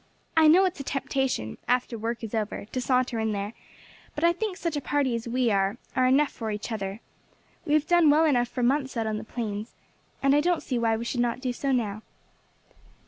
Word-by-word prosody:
I 320 Hz, -1 st, +6 dB
know 360 Hz, +5 st, +7 dB
it's 365 Hz, -4 st, -2 dB
a -, -, -4 dB
temptation, 265 Hz, -, -2 dB
after 250 Hz, -1 st, +1 dB
work 230 Hz, +1 st, -4 dB
is 225 Hz, -, -6 dB
over, 215 Hz, -2 st, -2 dB
to 255 Hz, +4 st, -4 dB
saunter 250 Hz, -2 st, +1 dB
in 220 Hz, -1 st, 0 dB
there; 200 Hz, +2 st, -3 dB, 0.6 s
but 295 Hz, -, -3 dB
I 340 Hz, 0 st, +5 dB
think 385 Hz, 0 st, -3 dB
such 335 Hz, -3 st, -2 dB
a 290 Hz, -, -1 dB
party 280 Hz, -3 st, 0 dB
as 230 Hz, 0 st, -3 dB
we 245 Hz, -1 st, +1 dB
are 195 Hz, 0 st, +1 dB, 0.2 s
are 255 Hz, -1 st, +3 dB
enough 275 Hz, +3 st, +3 dB
for 225 Hz, -2 st, -5 dB
each 210 Hz, +2 st, -4 dB
other. 200 Hz, 0 st, -4 dB, 0.7 s
We 300 Hz, -, +3 dB
have 305 Hz, 0 st, +2 dB
done 345 Hz, -3 st, +5 dB
well 310 Hz, +2 st, +5 dB
enough 245 Hz, -5 st, +3 dB
for 250 Hz, 0 st, -3 dB
months 265 Hz, 0 st, +1 dB
out 225 Hz, -, 0 dB
on 215 Hz, -1 st, -2 dB
the -, -, -7 dB
plains, 220 Hz, -1 st, -5 dB, 0.5 s
and 275 Hz, 0 st, +4 dB
I 295 Hz, -, +4 dB
don't 350 Hz, +1 st, +1 dB
see 250 Hz, -3 st, -1 dB
why 225 Hz, -1 st, +2 dB
we 230 Hz, -, -5 dB
should 245 Hz, -, -2 dB
not 240 Hz, 0 st, 0 dB
do 255 Hz, -1 st, -2 dB
so 275 Hz, +2 st, -2 dB
now. 215 Hz, -5 st, -1 dB
250 Hz, 225 wpm, -27 LUFS, 225-290 Hz, 0.7 s, know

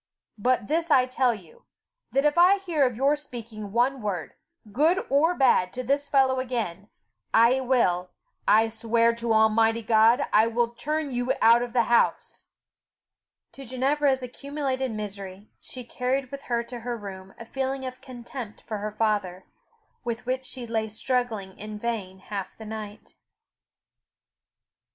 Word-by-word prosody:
But 245 Hz, -1 st, +1 dB
this 330 Hz, +1 st, 0 dB
I 255 Hz, -4 st, +5 dB
tell 255 Hz, -1 st, +1 dB
you, 180 Hz, -6 st, -16 dB, 0.5 s
that 275 Hz, +2 st, +1 dB
if 295 Hz, -, +3 dB
I 360 Hz, +3 st, +6 dB
hear 335 Hz, -8 st, +1 dB
of 250 Hz, -, -4 dB
your 275 Hz, +5 st, +3 dB
speaking 230 Hz, -8 st, -8 dB
one 250 Hz, +4 st, +1 dB
word, 195 Hz, -6 st, -3 dB, 0.4 s
good 320 Hz, -, +2 dB
or 320 Hz, +6 st, +3 dB
bad, 245 Hz, -, +3 dB
to 255 Hz, -, -4 dB
the 275 Hz, +4 st, +2 dB
fellow 270 Hz, -2 st, +2 dB
again, 225 Hz, -6 st, -3 dB, 0.5 s
I 235 Hz, +4 st, +5 dB
will, 210 Hz, -9 st, +1 dB, 0.4 s
I 220 Hz, +2 st, +5 dB
swear 230 Hz, +1 st, +2 dB
to 235 Hz, 0 st, -3 dB
Almighty 225 Hz, +1 st, +3 dB
God, 225 Hz, +4 st, +4 dB
I 220 Hz, +2 st, +5 dB
will 230 Hz, +1 st, +1 dB
turn 300 Hz, +4 st, -3 dB
you 245 Hz, 0 st, 0 dB
out 230 Hz, +1 st, +6 dB
of 245 Hz, -1 st, -4 dB
the 240 Hz, -2 st, +4 dB
house." 235 Hz, +1 st, +1 dB, 1.0 s
To 275 Hz, -, -11 dB
Ginevra's 265 Hz, +2 st, +1 dB
accumulated 265 Hz, 0 st, -3 dB
misery, 200 Hz, -2 st, -7 dB
she 255 Hz, -, -8 dB
carried 255 Hz, +2 st, -2 dB
with 280 Hz, 0 st, -8 dB
her 235 Hz, -1 st, +1 dB
to 240 Hz, +1 st, -8 dB
her 240 Hz, +1 st, -4 dB
room 195 Hz, -2 st, -9 dB
a 230 Hz, -, -9 dB
feeling 265 Hz, +2 st, -3 dB
of 255 Hz, 0 st, -7 dB
contempt 240 Hz, -3 st, -9 dB
for 215 Hz, -2 st, -5 dB
her 210 Hz, +1 st, -4 dB
father, 205 Hz, -4 st, -1 dB, 0.6 s
with 240 Hz, 0 st, -4 dB
which 255 Hz, +1 st, -2 dB
she 250 Hz, -1 st, -6 dB
lay 220 Hz, -1 st, -2 dB
struggling 220 Hz, -4 st, -2 dB
in 210 Hz, 0 st, -7 dB
vain 210 Hz, -4 st, -4 dB
half 195 Hz, 0 st, -6 dB
the 220 Hz, -, -10 dB
night. 215 Hz, -1 st, -8 dB
235 Hz, 155 wpm, -26 LUFS, 215-265 Hz, 1.0 s, I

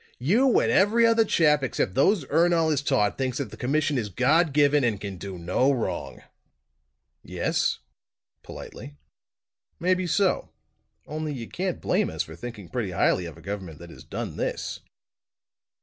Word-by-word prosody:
"You 225 Hz, -, +3 dB
and -, -, +1 dB
every 220 Hz, +4 st, +4 dB
other 230 Hz, 0 st, +4 dB
chap 150 Hz, -8 st, +3 dB
except 120 Hz, -7 st, -1 dB
those 165 Hz, -, +3 dB
Ernol 165 Hz, +2 st, +2 dB
has 145 Hz, -2 st, +1 dB
taught, 105 Hz, -6 st, +1 dB
thinks 130 Hz, -1 st, -1 dB
that 140 Hz, -, -4 dB
the -, -, -9 dB
commission 145 Hz, +2 st, 0 dB
is 105 Hz, -3 st, -4 dB
God 150 Hz, -, +2 dB
given 145 Hz, 0 st, +3 dB
and 110 Hz, -4 st, 0 dB
can 100 Hz, -2 st, -6 dB
do 95 Hz, 0 st, -7 dB
no 90 Hz, +11 st, +1 dB
wrong!" 125 Hz, -5 st, -3 dB, 1.0 s
"Yes?" -, -, -1 dB, 0.6 s
politely. 70 Hz, 0 st, -10 dB, 0.8 s
"Maybe 185 Hz, +1 st, +1 dB
so; 185 Hz, +3 st, +1 dB, 0.6 s
only, 155 Hz, 0 st, -4 dB
you 115 Hz, -3 st, -6 dB
can't 185 Hz, -1 st, -3 dB
blame 200 Hz, +2 st, +1 dB
us -, -, -2 dB
for -, -, -11 dB
thinking 115 Hz, -6 st, -8 dB
pretty 115 Hz, -1 st, -3 dB
highly 90 Hz, 0 st, +1 dB
of 85 Hz, -, -10 dB
a -, -, -14 dB
government 95 Hz, -3 st, -6 dB
that 85 Hz, 0 st, -12 dB
has -, -, -13 dB
done -, -, -6 dB
this." -, -, -3 dB
140 Hz, 160 wpm, -25 LUFS, 105-170 Hz, 1.0 s, every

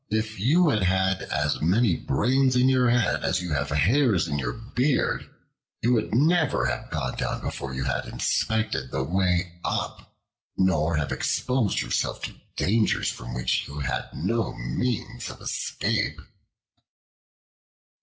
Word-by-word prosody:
If 110 Hz, -1 st, -2 dB
you 155 Hz, -, +4 dB
had 95 Hz, -3 st, +2 dB
as 75 Hz, -1 st, -1 dB
many 95 Hz, +4 st, +3 dB
brains 130 Hz, -, +2 dB
in 125 Hz, +1 st, +4 dB
your 130 Hz, -2 st, +3 dB
head 120 Hz, -2 st, +2 dB
as -, -, +1 dB
you 90 Hz, -3 st, -3 dB
have 70 Hz, -1 st, -1 dB
hairs 100 Hz, -, +3 dB
in 75 Hz, -2 st, -2 dB
your 65 Hz, -, -2 dB
beard, 125 Hz, +5 st, 0 dB, 0.5 s
you 120 Hz, +2 st, +4 dB
would 115 Hz, -, 0 dB
never 150 Hz, -, +3 dB
have -, -, -2 dB
gone 65 Hz, -1 st, -3 dB
down -, -, -2 dB
before 65 Hz, -1 st, -5 dB
you 65 Hz, -, -2 dB
had 65 Hz, -1 st, -2 dB
inspected 110 Hz, -, -1 dB
the 65 Hz, 0 st, -1 dB
way 90 Hz, +1 st, 0 dB
up, -, -, -3 dB, 0.5 s
nor 85 Hz, -4 st, +2 dB
have 75 Hz, -2 st, -1 dB
exposed 125 Hz, -5 st, 0 dB
yourself -, -, -2 dB
to -, -, -4 dB, 0.2 s
dangers 110 Hz, +3 st, +1 dB
from -, -, -7 dB
which 60 Hz, -, 0 dB
you 70 Hz, -, -8 dB
had 65 Hz, -1 st, -2 dB
no 110 Hz, +7 st, -1 dB
means 90 Hz, -, -3 dB
of -, -, -10 dB
escape." -, -, -1 dB
95 Hz, 145 wpm, -26 LUFS, 75-120 Hz, 0.5 s, you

